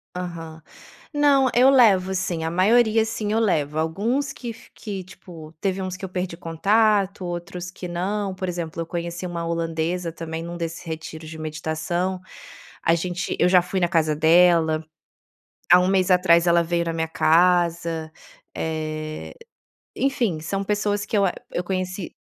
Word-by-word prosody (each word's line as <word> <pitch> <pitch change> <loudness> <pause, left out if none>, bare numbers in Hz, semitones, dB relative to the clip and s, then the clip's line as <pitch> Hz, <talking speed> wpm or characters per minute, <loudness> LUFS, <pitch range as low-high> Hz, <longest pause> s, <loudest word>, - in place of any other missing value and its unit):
Aham. 165 -3 -6 0.5
Não, 285 -3 +4
eu 255 +2 +6
levo, 200 -8 +5
sim, 175 -3 -2
a 160 - -1
maioria, 220 +5 +4
assim, 220 -2 -3
eu 225 - +2
levo. 155 -9 0
Alguns 210 - -1
que 240 -2 -6
fi 225 - -17
que 200 -4 -6
tipo 170 -3 -12
teve 195 -1 -1
uns 185 -1 -4
que 190 - -13
eu 190 - -4
perdi 180 -1 -3
contato, 200 +4 +1
outros 175 +1 -5
que 180 0 -8
não. 195 +3 -2
Por 185 0 -4
exemplo, 170 -2 -4
eu - - -3
conheci 170 +1 -4
uma 170 -1 -4
holandesa 165 +1 -2
também 165 0 -6
num 170 +1 -6
desses 165 -1 -5
retiros 160 -1 -7
de 160 - -8
meditação. 160 +4 -3 0.6
A 165 - +4
gente 175 +1 -3
eu 175 - +4
já 180 -1 +6
fui 180 +2 -3
na 175 - +2
casa 160 -2 +2
dela, 160 0 +4 0.9
há 180 - +9
1 180 - +2
mês 190 -1 +2
atrás 180 -2 +5
ela 170 0 +5
veio 170 0 -1
na 165 - -2
minha 165 0 -1
casa. 170 -1 +2 0.4
Eh, 155 - -4 0.6
enfim, 240 - 0
são 195 +5 -2
pessoas 205 0 -1
que - - -3
eu 200 - +4
a 180 - 0 0.2
eu 175 - -1
conheci 185 0 -3
175 Hz, 165 wpm, -23 LUFS, 165-195 Hz, 0.9 s, há